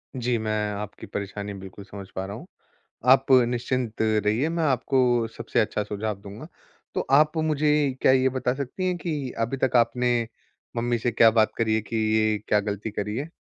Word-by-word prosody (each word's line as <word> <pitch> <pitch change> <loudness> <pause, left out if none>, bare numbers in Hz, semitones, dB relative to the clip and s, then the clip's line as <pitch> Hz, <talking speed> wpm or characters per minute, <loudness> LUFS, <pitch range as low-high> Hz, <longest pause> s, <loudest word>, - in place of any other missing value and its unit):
जी, 125 -1 0
मैं 110 -1 -1
आपकी 105 0 -7
परेशानी 100 0 -5
बिल्कुल 95 0 -10
समझ 100 -2 -9
पा 95 - -3
रहा 100 +1 -6
हूँ। - - -9 0.7
आप 135 0 +2 0.2
निश्चिंत 120 -1 -2
रहिए, 110 +6 +1
मैं 170 0 -1
आपको 125 -4 +2
सबसे - - -2
अच्छा 105 -1 0
सुझाव 105 0 -3
दूँगा। 100 0 -10 0.5
तो - - +1
आप 150 +3 +4
मुझे 155 -1 +1 0.3
क्या - - +5
ये 130 0 +4
बता 130 -1 -1
सकती 145 +7 -3
हैं 180 - 0
कि 150 -7 -3
अभी 115 +4 -1
तक 130 - +2
आपने 120 -1 +2 0.5
मम्मी 120 +1 0
से 120 - 0
क्या 115 0 +6
बात 110 -1 +3
करी 110 -2 +1
है 110 - +1
कि 115 - -7 0.2
ये 110 -1 +2
क्या 105 - +3
गलती 105 +1 -4
करी 105 +1 -3
है? 145 +5 -4
115 Hz, 190 wpm, -25 LUFS, 105-130 Hz, 0.7 s, क्या